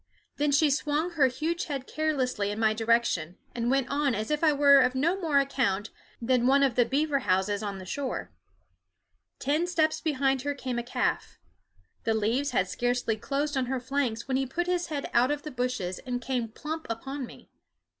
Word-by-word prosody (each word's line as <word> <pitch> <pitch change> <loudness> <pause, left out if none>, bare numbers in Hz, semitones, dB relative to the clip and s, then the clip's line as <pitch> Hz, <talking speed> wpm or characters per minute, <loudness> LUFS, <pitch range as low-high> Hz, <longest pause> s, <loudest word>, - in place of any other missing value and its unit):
Then 290 0 +1
she 290 +1 +4
swung 300 +4 0
her 300 -6 +4
huge 320 +6 -2
head 275 -4 -4
carelessly 265 -10 -1
in 205 - -3
my 220 -1 +3
direction, 225 -7 +1 0.2
and 235 0 -1
went 270 -1 +2
on 280 -3 +1
as 215 +6 -3
if 300 +1 0
I 315 - +6
were 280 -1 +6
of 255 0 +3
no 320 +8 +2
more 310 -5 +2
account 250 -7 +1 0.3
than 245 +1 +2
one 280 +1 +5
of 270 -3 +3
the 245 +1 +3
beaver 280 +3 +1
houses 200 -2 +1
on 200 -2 -4
the 185 - -9
shore. 265 +7 -4 1.1
Ten 300 +6 0
steps 315 -3 +1
behind 270 -3 +1
her 285 +1 -2
came 255 -3 -3
a - - -3
calf. 240 - -2 0.7
The 225 - +1
leaves 230 +7 +1
had 195 -6 +1
scarcely 245 +1 0
closed 285 +6 -2
on 260 -2 0
her 260 0 -1
flanks 255 -3 -2
when 260 -1 +1
he 270 0 -1
put 345 +7 -2
his 355 -1 0
head 290 -3 -3
out 245 +2 +4
of 290 0 -2
the 305 - -6
bushes 245 -8 -2
and 250 -1 -3
came 245 -1 -2
plump 310 +8 -6
upon 265 +3 -4
me. - - -15
265 Hz, 195 wpm, -28 LUFS, 235-290 Hz, 1.1 s, I